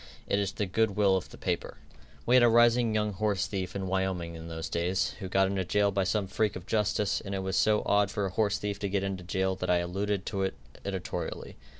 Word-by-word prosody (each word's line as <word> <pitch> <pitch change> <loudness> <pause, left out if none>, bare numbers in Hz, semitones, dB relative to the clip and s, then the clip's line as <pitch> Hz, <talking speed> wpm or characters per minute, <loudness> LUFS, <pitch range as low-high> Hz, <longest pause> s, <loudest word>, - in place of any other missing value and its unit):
It 100 - +1
is 100 -1 -1
the 105 - -1
good 100 +2 +1
will 100 -2 +4
of 95 - -3
the - - -12
paper." - - -3 0.5
We 125 - +4
had 125 - +7
a 120 - +6
rising 120 -1 +4
young 105 -1 0
horsethief 100 -2 -1
in 95 -1 -2
Wyoming 95 -3 -1
in 80 0 -8
those 80 -1 -5
days, 90 +3 0
who 95 -3 -5
got 95 +1 +3
into 95 0 -1
jail 100 +2 +2
by 95 -1 0
some 100 +1 0
freak 105 +2 0
of 90 -1 -7
justice, 105 -1 0
and 100 -1 -4
it 95 - -3
was 95 -1 -2
so 105 +2 +3
odd 100 -1 +3
for 105 -1 -2
a 95 - -3
horsethief 100 0 0
to 100 - -2
get 100 0 0
into 95 -2 -3
jail 95 +1 0
that - - -3
I 90 - +4
alluded 95 +3 -2
to 100 -3 -2
it 95 -6 -1 0.3
editorially. 95 -4 -4
95 Hz, 235 wpm, -29 LUFS, 95-105 Hz, 0.5 s, had